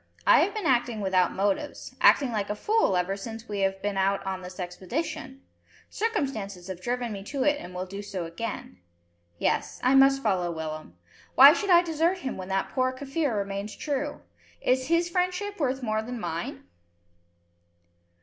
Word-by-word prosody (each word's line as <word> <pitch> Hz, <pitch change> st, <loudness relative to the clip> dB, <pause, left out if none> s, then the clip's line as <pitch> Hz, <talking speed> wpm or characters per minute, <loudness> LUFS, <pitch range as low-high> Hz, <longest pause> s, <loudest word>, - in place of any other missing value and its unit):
"I -, -, +7 dB
have -, -, +1 dB
been 430 Hz, -, -3 dB
acting 240 Hz, -3 st, +2 dB
without 190 Hz, -3 st, +2 dB
motives, 200 Hz, +9 st, -2 dB
acting 275 Hz, -4 st, +5 dB
like 210 Hz, -3 st, -2 dB
a 210 Hz, -, -1 dB
fool 420 Hz, -, +2 dB
ever 180 Hz, +2 st, 0 dB
since 225 Hz, +3 st, -8 dB
we 205 Hz, -1 st, -4 dB
have 195 Hz, 0 st, 0 dB
been 205 Hz, -1 st, -1 dB
out 195 Hz, +1 st, +1 dB
on 190 Hz, -1 st, -3 dB
this 180 Hz, +1 st, -10 dB
expedition. 180 Hz, -, -5 dB, 0.5 s
Circumstances 225 Hz, -, -2 dB
have 185 Hz, -1 st, -6 dB
driven 245 Hz, 0 st, -2 dB
me 200 Hz, -2 st, -6 dB
to 270 Hz, +4 st, -2 dB
it 290 Hz, 0 st, +2 dB
and 180 Hz, +1 st, -9 dB
will 180 Hz, +1 st, -3 dB
do 195 Hz, +2 st, -7 dB
so 195 Hz, -4 st, -5 dB
again. 165 Hz, -, -6 dB, 0.6 s
Yes. -, -, -1 dB
I 255 Hz, +2 st, +4 dB
must 270 Hz, 0 st, +5 dB
follow 185 Hz, -5 st, +1 dB
Willem. 155 Hz, -, -6 dB, 0.4 s
Why 275 Hz, +3 st, +10 dB
should 400 Hz, +3 st, -2 dB
I 350 Hz, -1 st, +7 dB
desert 335 Hz, +2 st, +1 dB
him 265 Hz, -8 st, -4 dB
when 185 Hz, -1 st, -7 dB
that 195 Hz, 0 st, -1 dB
poor 255 Hz, -1 st, +1 dB
Kaffir 275 Hz, -1 st, -2 dB
remains 200 Hz, +1 st, -4 dB
true? 290 Hz, 0 st, -3 dB, 0.4 s
If 255 Hz, 0 st, +1 dB
his 335 Hz, +2 st, +2 dB
friendship 365 Hz, +3 st, -1 dB
worth 265 Hz, -3 st, -1 dB
more 215 Hz, -2 st, 0 dB
than 245 Hz, +2 st, -6 dB
mine?" 170 Hz, -3 st, -4 dB
220 Hz, 175 wpm, -27 LUFS, 190-280 Hz, 0.6 s, Why